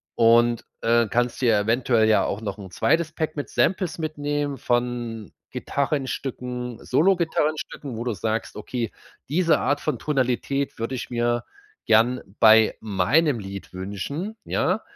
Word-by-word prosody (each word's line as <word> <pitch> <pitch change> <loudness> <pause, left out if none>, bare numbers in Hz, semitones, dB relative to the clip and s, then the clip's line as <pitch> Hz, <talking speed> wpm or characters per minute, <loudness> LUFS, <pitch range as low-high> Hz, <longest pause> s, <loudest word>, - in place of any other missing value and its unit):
Und, 115 0 +4 0.2
äh, 115 0 +3
kannst 120 +1 0
dir 120 -3 +4
ja 105 -2 +3
eventuell 115 0 +2
ja 110 - +4
auch 100 - -3
noch 100 -3 -4
'n 95 -2 -9
2. 165 -1 +1
Pack 155 -1 -2
mit 145 - -4
Samples 185 -3 +1
mitnehmen 145 -2 -2
von 120 -2 -2 0.2
Gitarrenstücken, 125 -4 -3
Solo-Gitarrenstücken, 155 -4 0
wo 115 - -3
du 120 - 0
sagst: 110 +3 -3
„Okay, 115 +1 -3 0.4
diese 165 +1 +3
Art 145 - +1
von 150 -6 -1
Tonalität 135 0 -1
würde 115 +3 -2
ich 120 - -5
mir 120 0 0 0.4
gern 115 +3 +4 0.2
bei 110 -1 +7
meinem 115 - +2
Lied 100 -1 -8
wünschen.“ 105 - -5
Ja? 190 +5 0
120 Hz, 140 wpm, -24 LUFS, 115-145 Hz, 0.4 s, bei